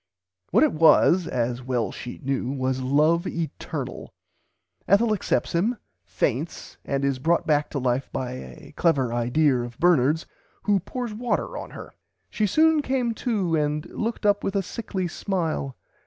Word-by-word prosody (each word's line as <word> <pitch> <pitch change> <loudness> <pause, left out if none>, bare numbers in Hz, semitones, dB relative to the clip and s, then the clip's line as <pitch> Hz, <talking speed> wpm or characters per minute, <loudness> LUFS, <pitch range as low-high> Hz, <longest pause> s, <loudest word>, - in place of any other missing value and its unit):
What - - +4
it - - +3
was 165 +3 +5
(as 120 0 -1
well 125 -3 -1
she 125 - -8
knew) 135 -1 -1
was 130 -1 -1
love 155 +7 +2
eternal. 165 -2 -5 0.7
Ethel 215 +3 +4
accepts 175 -10 -1
him, 215 +9 +1 0.3
faints 140 +6 -3
and 140 0 -1
is 135 -2 0
brought 165 +5 +2
back 150 -1 +2
to 150 - -4
life 130 0 0
by 125 -1 -3
a 65 - -10
clever 135 -8 +2
"idear" 125 +2 +2
of 120 -1 -8
Bernard's, 160 -2 +3 0.4
who 205 -2 +3
pours 240 +4 -5
water 245 - -2
on - - -6
her. - - -10 0.4
"She 215 - +1
soon 315 +7 +4
came 255 -4 0
to 205 -8 0
and 150 0 0
looked 225 -1 -3
up 205 -1 +3
with 195 - -2
a 195 - +1
sickly 190 -2 -4
smile. 165 -7 -2
160 Hz, 155 wpm, -25 LUFS, 130-200 Hz, 0.7 s, was